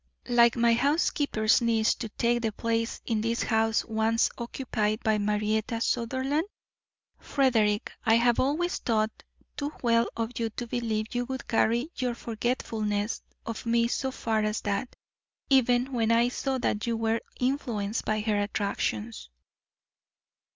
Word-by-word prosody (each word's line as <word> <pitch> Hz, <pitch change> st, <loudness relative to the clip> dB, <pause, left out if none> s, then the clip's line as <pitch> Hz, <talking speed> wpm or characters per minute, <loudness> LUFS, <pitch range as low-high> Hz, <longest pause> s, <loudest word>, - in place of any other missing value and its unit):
"Like 235 Hz, -1 st, +5 dB
my 235 Hz, -1 st, +4 dB
housekeeper's 275 Hz, -4 st, +2 dB
niece 225 Hz, -1 st, +3 dB
to 225 Hz, -, -6 dB
take 240 Hz, +2 st, 0 dB
the 225 Hz, -2 st, 0 dB
place 230 Hz, +1 st, -1 dB
in 225 Hz, -3 st, 0 dB
this 230 Hz, +1 st, 0 dB
house 225 Hz, -1 st, +1 dB
once 225 Hz, 0 st, +1 dB
occupied 235 Hz, -3 st, -2 dB
by 215 Hz, -2 st, +2 dB
Marietta 210 Hz, +2 st, 0 dB
Sutherland? 260 Hz, +7 st, 0 dB, 0.7 s
Frederick, 225 Hz, -7 st, +1 dB
I 225 Hz, -, +4 dB
have 235 Hz, 0 st, +3 dB
always 315 Hz, +7 st, 0 dB
thought 220 Hz, -2 st, +1 dB, 0.4 s
too 290 Hz, 0 st, -3 dB
well 230 Hz, -1 st, +3 dB
of 230 Hz, +1 st, -3 dB
you 230 Hz, -1 st, 0 dB
to 240 Hz, +3 st, -5 dB
believe 225 Hz, -2 st, -2 dB
you 245 Hz, 0 st, -1 dB
would 260 Hz, 0 st, -6 dB
carry 235 Hz, +6 st, +1 dB
your 250 Hz, -2 st, -1 dB
forgetfulness 220 Hz, -3 st, -2 dB, 0.2 s
of 230 Hz, 0 st, -5 dB
me 235 Hz, 0 st, +3 dB
so 265 Hz, +2 st, -1 dB
far 225 Hz, -4 st, -1 dB
as 215 Hz, 0 st, -1 dB
that, 200 Hz, +4 st, -2 dB, 0.6 s
even 250 Hz, 0 st, +3 dB
when 230 Hz, -2 st, +1 dB
I 235 Hz, +1 st, +4 dB
saw 265 Hz, +1 st, -2 dB
that 220 Hz, -3 st, -1 dB
you 230 Hz, -1 st, 0 dB
were 225 Hz, 0 st, 0 dB, 0.2 s
influenced 235 Hz, -5 st, -1 dB
by 215 Hz, 0 st, 0 dB
her 210 Hz, -1 st, +1 dB
attractions." 115 Hz, -, -2 dB
230 Hz, 145 wpm, -28 LUFS, 220-245 Hz, 0.7 s, Like